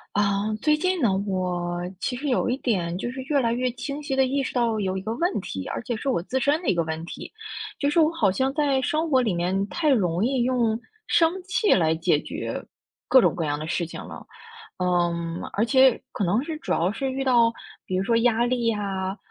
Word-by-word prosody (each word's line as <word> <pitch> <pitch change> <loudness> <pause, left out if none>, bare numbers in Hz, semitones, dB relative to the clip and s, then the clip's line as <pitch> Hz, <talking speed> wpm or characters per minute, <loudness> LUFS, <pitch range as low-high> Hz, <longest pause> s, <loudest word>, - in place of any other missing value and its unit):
啊， 200 0 +1
最 300 -1 +3
近 370 +1 0
呢， 235 - +4 0.2
我 175 -2 -2 0.2
其 250 - -2
实 285 +4 -3
有 245 - +1
一 250 - +1
点， 175 -7 -1
就 240 +5 -3
是 265 - -6
越 285 +2 0
来 230 -2 +1
越 250 +2 0
清 280 +4 -5
晰 285 -2 -2
地 265 0 +4
意 275 +2 0
识 270 - -4
到 235 -3 +1
有 190 -2 -1
一 190 - -3
个 215 +4 -3
问 345 - 0
题， 95 - -6
而 - - -4
且 240 - -3
是 275 - -6
我 255 -10 +1
自 260 +7 -1
身 290 +5 +2
的 360 - -1
一 - - +4
个 170 - +1
问 160 0 -4
题， 170 - -8 0.5
就 285 - +2
是 335 - +2
我 310 -1 +5
好 215 - +2
像 265 +7 0
在 285 -3 +1
生 310 +4 -1
活 260 - +5
里 220 -6 0
面 185 +3 0
太 310 +7 0
容 190 - +2
易 255 -1 +1
用 240 -3 +1 0.3
生 330 -1 +4
气 380 +3 +2
来 160 -3 +3
解 160 -1 +2
决 - - -5 0.5
各 260 - +8
种 - - +3
各 170 - -2
样 145 -1 -1
的 155 - -5
事 170 +1 -1
情 165 - -8
了。 - - -10 0.5
嗯， 175 -2 0
而 220 +3 +1
且 260 0 +5
可 - - -2
能 195 +6 +2
是 320 -1 -4
主 - - -5
要 170 +2 +2
是 265 +6 -2
遇 265 +1 -3
到， 240 -3 +4 0.3
比 185 - -2
如 190 - 0
说 230 - +2
压 235 0 +3
力 245 -1 0
呀， 195 -3 -2
230 Hz, 250 characters per minute, -25 LUFS, 185-270 Hz, 0.5 s, 各